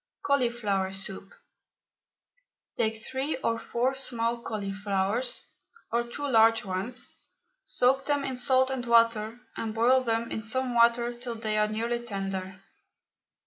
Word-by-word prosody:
CAULIFLOWER 235 -8 +1
SOUP. 195 0 -3 1.4
Take 220 0 +1
three 265 +7 -3
or 230 0 +1
four 250 +3 0
small 235 -3 -1
cauliflowers, 200 +2 -2 0.5
or 235 +1 +1
two 285 +5 -5
large 225 -3 +4
ones, 200 +7 -4 0.5
soak 265 +2 +2
them 290 -1 +1
in 265 -2 -3
salt 260 +1 +3
and 260 -2 -2
water, 230 -1 +3 0.2
and 225 -1 -4
boil 255 +3 +4
them 230 -1 -1
in 220 - -2
some 250 +3 -1
water 235 0 +4
till 240 0 -6
they 220 -1 -2
are 210 0 +3
nearly 230 +3 -1
tender. 195 -3 -5
230 Hz, 130 wpm, -28 LUFS, 215-250 Hz, 1.4 s, large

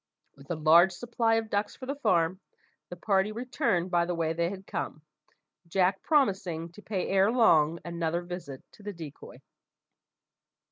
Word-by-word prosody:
With 140 0 -17
a 175 - -1
large 165 +4 +5
supply 230 +2 0
of 225 -1 -2
ducks 205 +1 -1
for 260 - -9
the 275 - -2
farm, 185 - +1 0.5
the 175 - -7
party 195 +3 +1
returned 230 - -1
by 170 -1 +2
the 175 - -1
way 165 -1 0
they 170 +1 0
had 190 0 -8
come, 155 - -5 0.6
Jack 185 +2 +1
promising 190 - 0
to 210 - -14
pay 200 -3 -3
ere 195 +2 +3
long 165 -10 +4
another 170 0 -2
visit 175 -7 -8
to - - -18
the 205 0 -6
decoy. 160 -5 -11
180 Hz, 160 wpm, -28 LUFS, 170-210 Hz, 0.6 s, large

